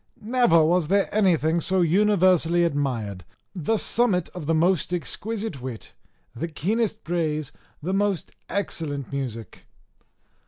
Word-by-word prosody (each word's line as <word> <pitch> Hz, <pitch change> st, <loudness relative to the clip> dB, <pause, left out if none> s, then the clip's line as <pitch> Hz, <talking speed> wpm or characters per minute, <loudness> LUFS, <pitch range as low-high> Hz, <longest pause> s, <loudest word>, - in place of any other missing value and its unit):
Never 220 Hz, -8 st, +3 dB
was 175 Hz, -1 st, +2 dB
there 200 Hz, +3 st, +1 dB
anything 170 Hz, -5 st, +2 dB
so 185 Hz, +3 st, +1 dB
universally 180 Hz, -2 st, +3 dB
admired, 125 Hz, -, -2 dB, 0.3 s
the 200 Hz, +4 st, 0 dB
summit 205 Hz, -7 st, +1 dB
of 175 Hz, -5 st, -8 dB
the 165 Hz, -, +2 dB
most 175 Hz, +1 st, +2 dB
exquisite 200 Hz, -, -3 dB
wit, 125 Hz, -3 st, -7 dB, 0.4 s
the 145 Hz, +8 st, -3 dB
keenest 215 Hz, +8 st, -1 dB
praise, 155 Hz, -4 st, -2 dB, 0.3 s
the 185 Hz, +4 st, -1 dB
most 200 Hz, -3 st, 0 dB, 0.2 s
excellent 155 Hz, -8 st, -3 dB
music. 120 Hz, -5 st, -6 dB
170 Hz, 120 wpm, -24 LUFS, 150-200 Hz, 0.4 s, Never